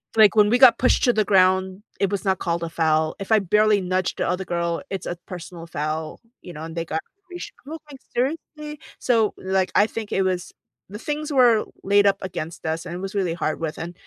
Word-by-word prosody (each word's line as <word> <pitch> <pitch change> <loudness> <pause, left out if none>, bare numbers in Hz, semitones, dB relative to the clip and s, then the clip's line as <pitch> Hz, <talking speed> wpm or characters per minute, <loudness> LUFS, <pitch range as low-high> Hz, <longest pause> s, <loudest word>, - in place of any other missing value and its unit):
Like, 215 -3 +7
when 210 -1 +5
we 240 - +4
got 260 -2 +8
pushed 255 - +3
to 245 - +4
the 215 -2 +1
ground, 190 0 +3 0.2
it 195 - +2
was 200 - -2
not 190 -2 +1
called 170 0 -1
a 165 - -3
foul. 160 -1 +1
If 195 +2 -7
I 220 - +6
barely 210 +2 +3
nudged 185 0 -1
the - - 0
other 185 +1 -2
girl, 170 -1 -1
it's 195 - -4
a 175 - -4
personal 175 -2 -8
foul, 155 0 -4 0.2
you 175 - -10
know, 155 0 -8
and 165 0 -7
they 165 0 -2
got 160 0 -3 0.3
probation 355 -1 -8 0.3
like, 275 -2 -11 0.2
seriously? 300 +3 -3 0.2
So, 225 -4 +2
like, 190 0 0
I 205 - +5
think 220 -2 -6
it 195 - +2
was 185 -2 -2 0.4
The 205 +2 -8
things 300 +3 -4
were 240 -5 +5 0.2
laid 200 +1 +4
up 195 0 +3
against 170 -3 -6
us, 160 +1 -2
and 165 - -6
it - - -5
was 195 +2 -5
really 185 -4 0
hard 155 -2 -2
with 160 -2 -3
and 170 +1 -6
190 Hz, 225 wpm, -23 LUFS, 170-215 Hz, 0.4 s, got